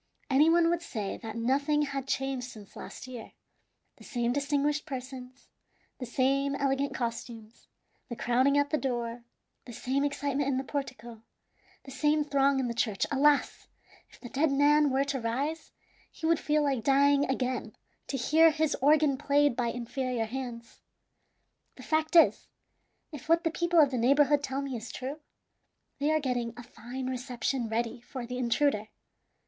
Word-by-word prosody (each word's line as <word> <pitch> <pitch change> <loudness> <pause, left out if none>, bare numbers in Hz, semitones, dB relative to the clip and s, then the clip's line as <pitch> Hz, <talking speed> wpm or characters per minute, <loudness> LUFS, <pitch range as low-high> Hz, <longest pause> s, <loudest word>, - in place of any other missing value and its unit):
Any 290 +4 +5
one 335 0 +4
would 345 -1 0
say 215 -11 -4
that 220 -2 -8
nothing 280 +6 +1
had 275 -2 -4
changed 270 -2 -2
since 210 -4 -13
last - - -9
year. 250 -3 -9 0.6
The - - -15
same 240 -2 -1
distinguished 290 +2 0
persons, 255 -1 -8 0.5
the 250 - -5
same 275 +3 +1
elegant 275 0 -1
costumes, 230 -2 -6 0.4
the 235 - -4
crowding 255 +5 +2
at 285 0 +1
the 305 - +1
door, 240 -2 -3 0.4
the 240 - -9
same 265 +5 -1
excitement 285 -1 -1
in 265 - 0
the 265 - -1
portico, 245 -5 -6 0.6
the 270 - -11
same 295 +3 +1
throng 280 -1 +2
in 260 - 0
the 235 - -2
church. 220 -4 0
Alas! 285 +1 +2 0.4
if - - -19
the 245 - -9
dead 285 +4 +1
man 290 +1 +4
were 265 +1 +2
to 280 -1 -2
rise, 275 +8 -3 0.4
he 320 - -7
would 330 -1 +3
feel 300 0 +1
like 270 -5 0
dying 280 +2 +4
again 255 -1 -2 0.3
to 275 - -2
hear 315 +6 +5
his 315 -1 0
organ 290 -1 +4
played 290 -2 +2
by 240 -1 0
inferior 245 0 -2
hands. 235 -1 -7 0.9
The - - -12
fact 315 +2 0
is, 330 - +5 0.6
if 300 0 -10
what 335 +1 +4
the 330 - 0
people 345 +1 +2
of 290 -3 +5
the 255 - -1
neighborhood 280 +4 +4
tell 275 0 -3
me 275 -2 -4
is 230 +1 -6
true, 270 +4 -6 0.8
they 290 +2 +1
are 310 0 +3
getting 245 -4 -2
a 245 - -8
fine 250 +2 -8
reception 250 -1 -2
ready 230 +1 -2
for 245 0 -7
the 250 +1 -5
intruder. 235 -2 +1
270 Hz, 165 wpm, -29 LUFS, 245-290 Hz, 0.9 s, Any